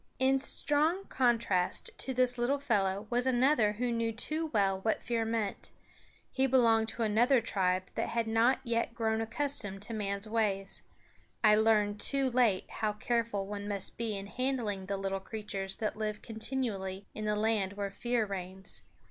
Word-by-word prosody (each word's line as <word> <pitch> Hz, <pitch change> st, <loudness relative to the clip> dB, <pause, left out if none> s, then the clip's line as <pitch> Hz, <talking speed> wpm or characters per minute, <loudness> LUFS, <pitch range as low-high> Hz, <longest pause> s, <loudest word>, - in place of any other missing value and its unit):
In 265 Hz, +1 st, +3 dB
strong 310 Hz, +7 st, +1 dB
contrast 230 Hz, -8 st, +1 dB
to 265 Hz, -, -2 dB
this 250 Hz, -1 st, +1 dB
little 255 Hz, +4 st, +2 dB
fellow 205 Hz, -7 st, 0 dB
was 245 Hz, +2 st, +1 dB
another 245 Hz, -4 st, +3 dB
who 240 Hz, +3 st, -1 dB
knew 230 Hz, -1 st, 0 dB
too 305 Hz, +8 st, -2 dB
well 195 Hz, -8 st, +1 dB
what 220 Hz, +2 st, 0 dB
fear 230 Hz, -2 st, 0 dB
meant. 220 Hz, -3 st, -2 dB, 0.6 s
He 265 Hz, 0 st, +2 dB
belonged 230 Hz, -4 st, +4 dB
to 230 Hz, -, -3 dB
another 235 Hz, +5 st, +4 dB
tribe 185 Hz, -5 st, 0 dB
that -, -, -2 dB
had 230 Hz, -1 st, 0 dB
not 225 Hz, +4 st, +3 dB
yet 235 Hz, -1 st, -1 dB
grown 220 Hz, -1 st, 0 dB
accustomed 225 Hz, -4 st, -2 dB
to 230 Hz, -, -7 dB
man's 200 Hz, -1 st, -2 dB
ways. 210 Hz, -3 st, -1 dB, 0.6 s
I 215 Hz, -1 st, +7 dB
learned 210 Hz, -1 st, +3 dB
too 275 Hz, +1 st, +1 dB
late 235 Hz, -6 st, +2 dB
how 215 Hz, -1 st, -2 dB
careful 230 Hz, -2 st, -1 dB
one 205 Hz, 0 st, -5 dB
must 200 Hz, -2 st, -3 dB
be 225 Hz, -3 st, -2 dB
in 195 Hz, -, -5 dB
handling 225 Hz, -5 st, -2 dB
the 200 Hz, 0 st, -2 dB
little 195 Hz, 0 st, -2 dB
creatures 195 Hz, -2 st, -5 dB
that 215 Hz, -, -2 dB
live 215 Hz, -1 st, -3 dB
continually 220 Hz, -5 st, -3 dB
in 215 Hz, -, -5 dB
the 210 Hz, 0 st, +1 dB
land 210 Hz, -2 st, +1 dB
where 200 Hz, -1 st, -3 dB
fear 240 Hz, +2 st, 0 dB
reigns. 190 Hz, -1 st, -7 dB
220 Hz, 165 wpm, -31 LUFS, 200-245 Hz, 0.6 s, I